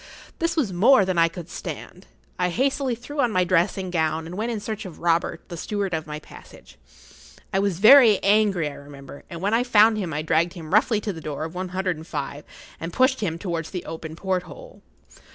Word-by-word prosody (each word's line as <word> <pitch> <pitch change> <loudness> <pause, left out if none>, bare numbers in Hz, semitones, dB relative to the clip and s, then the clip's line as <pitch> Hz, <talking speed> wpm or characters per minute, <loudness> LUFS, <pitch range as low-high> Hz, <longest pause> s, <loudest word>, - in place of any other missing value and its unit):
This 335 0 0
was 250 - 0
more 205 +4 +5
than 185 -2 0
I 165 - +5
could 170 0 -8
stand. - - -8 0.3
I 180 0 +2
hastily 265 +4 0
threw 285 +6 -9
on 240 - +2
my 185 -3 +2
dressing 185 +1 +1
gown 160 -1 0
and 170 +2 -8
went 225 +4 -2
in 225 - -3
search 215 +1 -5
of 185 -6 -9
Robert, 170 0 0
the 175 - -6
steward 200 +1 -3
of 160 -1 -3
my 150 0 -5
passage. 110 - -15 0.7
I 190 - +2
was 195 -3 0
very 220 +1 +8
angry, 200 -5 +3
I 145 - -6
remember, 140 -1 -12
and 170 -1 -7
when 205 +2 +1
I 235 +2 +3
found 220 -2 +4
him 180 -5 -3
I 150 +1 -2
dragged 165 +2 +1
him 165 -2 -8
roughly 215 0 +3
to 205 -1 -3
the 165 - -9
door 150 -1 -5
of 160 +1 -6
one 185 0 -4
hundred 185 -2 -2
and 160 +1 -11
five, 145 -1 -5 0.3
and 165 +1 -5
pushed 260 +6 +2
him 170 -6 -2
towards 170 -3 -4
the 180 -3 -6
open 160 -1 -7
porthole. 190 - -5
185 Hz, 215 wpm, -24 LUFS, 165-215 Hz, 0.7 s, very